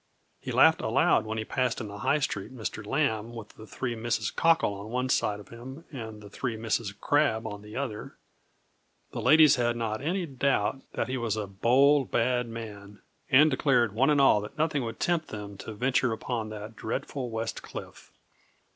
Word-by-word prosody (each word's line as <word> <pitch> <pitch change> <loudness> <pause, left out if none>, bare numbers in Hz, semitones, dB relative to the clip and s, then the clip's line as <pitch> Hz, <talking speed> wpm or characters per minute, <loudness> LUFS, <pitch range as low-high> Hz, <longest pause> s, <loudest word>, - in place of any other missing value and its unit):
He - - -6
laughed - - +5
aloud - - +3
when 110 0 -3
he 110 - -2
passed 125 0 -1
in 110 - -5
the 100 0 -8
High 145 - +2
Street 110 -7 -3
Mr. 110 -4 -5
Lambe 115 -2 -1
with 110 -2 -8
the 110 - -13
three 125 +1 -3
Misses 115 0 -1
Cockle 165 -10 +3
on 100 +2 -8
one 125 +2 -1
side 105 -4 +1
of 105 - -13
him, 130 +7 -10
and 110 -6 -7
the 105 - -11
three 120 -1 -3
Misses 110 -1 -1
Crabbe 110 +1 +1
on 105 -2 -6
the 105 +1 -11
other. 125 -6 -5 0.9
The - - -4
ladies 155 -2 +6
had 120 -1 +1
not 110 -1 -2
any 175 +5 -1
doubt 135 -4 0
that - - -1
he 130 +1 -2
was 115 -3 -1
a 105 - -2
bold 130 +8 +3
bad 125 +1 +1
man, 105 -3 -9 0.3
and 150 +4 +6
declared 125 -5 +2
one 130 +6 +3
and 150 -1 +4
all 135 -6 +5
that 105 +8 -9
nothing 150 -3 +1
would 115 - -6
tempt 170 -2 0
them 105 -1 -7
to 110 - -7
venture 125 +1 +1
upon 110 0 -3
that 110 +1 -8
dreadful 130 +3 -4
West 115 0 -4
Cliff. - - -10
115 Hz, 190 wpm, -28 LUFS, 110-135 Hz, 0.9 s, ladies